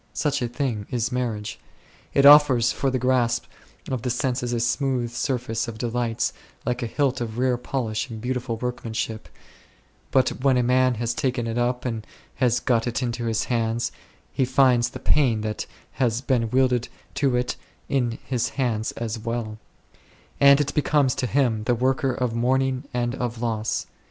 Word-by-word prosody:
Such 145 -2 0
a 120 - 0
thing 120 -4 -3
is 120 0 -1
marriage. 115 -4 -3 0.6
It 140 - +5
offers 140 -5 +7
for 135 - -1
the 130 - 0
grasp 125 -1 +1 0.5
of 130 -3 -1
the 125 - -2
senses 125 -1 -1
a 120 - 0
smooth 120 0 0
surface 120 -2 -2
of 115 -2 -6
delights, 120 0 -1 0.3
like 125 +2 -1
a 120 - -1
hilt 135 0 0
of 115 -1 -4
rare 125 0 +2
polish 120 -2 -3
and 110 -2 -6
beautiful 125 0 -3
workmanship; 115 -2 -4 0.8
but 130 -2 +3
when 135 -2 +4
a 125 - +3
man 130 0 +3
has 115 +1 -1
taken 125 -1 -1
it 115 +1 -2
up 125 +1 0
and 115 -3 -2 0.3
has 125 -2 +2
got 120 -2 +1
it 120 +2 -1
into 120 -1 -2
his 110 -1 0
hands, 115 -1 -1 0.4
he - - +1
finds 125 -2 +3
the - - -8
pain 125 -7 +2
that 105 0 -3 0.2
has 120 -3 0
been 120 -4 +1
wedded 125 -1 +2 0.3
to 135 -3 +1
it 125 0 0
is - - -19 0.3
in 120 -4 0
his 125 -3 -1
hands 115 -5 0
as 115 -1 -4
well; 110 -1 -4 0.8
and 140 0 +7
it 145 -1 0
becomes 145 -3 +2
to 125 - -2
him 120 -5 +1
the 120 - +2
worker 130 +2 +1
of 125 -2 -1
mourning 130 +3 +1
and 120 -1 -1
of 120 -3 -3
loss. 110 -2 -1
125 Hz, 175 wpm, -24 LUFS, 115-130 Hz, 0.8 s, offers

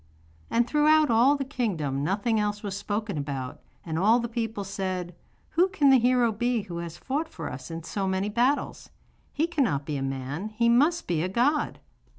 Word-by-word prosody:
And 235 +1 +2
throughout 305 0 +4
all 245 +6 +5
the 275 -1 -3
kingdom 170 - -2
nothing 210 +7 0
else 210 0 -2
was 200 -2 -3
spoken 205 -3 -3
about, 135 -2 -5 0.2
and 160 -1 -2
all 220 +6 +4
the 235 - -2
people 225 -3 -3
said: 185 -3 -4 0.4
'Who 355 +3 +4
can 300 -8 +3
the 265 - +7
hero 245 -1 +3
be 235 +1 0
who 175 -4 -7
has 170 -1 -6
fought 295 +5 -3
for - - -6
us 130 +4 -8
in 165 0 -6
so 195 +3 -3
many 190 +1 0
battles? 245 +7 0 0.4
He 310 - 0
cannot 260 - 0
be 150 -3 -3
a - - -4
man, 135 +8 -4
he 235 +2 +1
must 295 +9 +3
be 170 -3 0
a 180 - -1
god. 275 +9 +1
215 Hz, 190 wpm, -27 LUFS, 175-250 Hz, 0.4 s, the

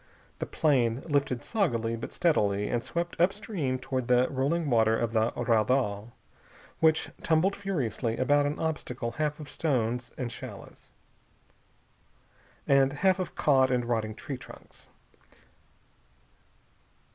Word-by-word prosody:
The - - -3
plane 130 -5 +1
lifted 140 -5 0
soggily 115 - 0
but 115 - -6
steadily 105 - +1
and 120 -1 -1
swept 170 0 -3
up 180 +2 +5
stream 190 -11 -3
toward 130 -1 -3
the 125 0 +4
rolling 145 +5 0
water 110 -3 +3
of 115 -1 -2
the 110 0 +2
raudal, 115 -2 +1 0.7
which 160 -1 +3
tumbled 165 +5 +2
furiously 130 - -2
about 145 +2 +3
an 145 - -3
obstacle 130 -7 -3
half 150 +3 -2
of 150 - -8
stones 125 -5 -1
and 125 -3 -3
shallows, - - -10 1.8
and 135 -1 +4
half 190 +5 +2
of 185 - -4
caught 130 -3 +3
and 125 -1 +1
rotting 110 -2 -1
tree 135 +2 -6
trunks. - - -14
130 Hz, 125 wpm, -28 LUFS, 115-155 Hz, 1.8 s, up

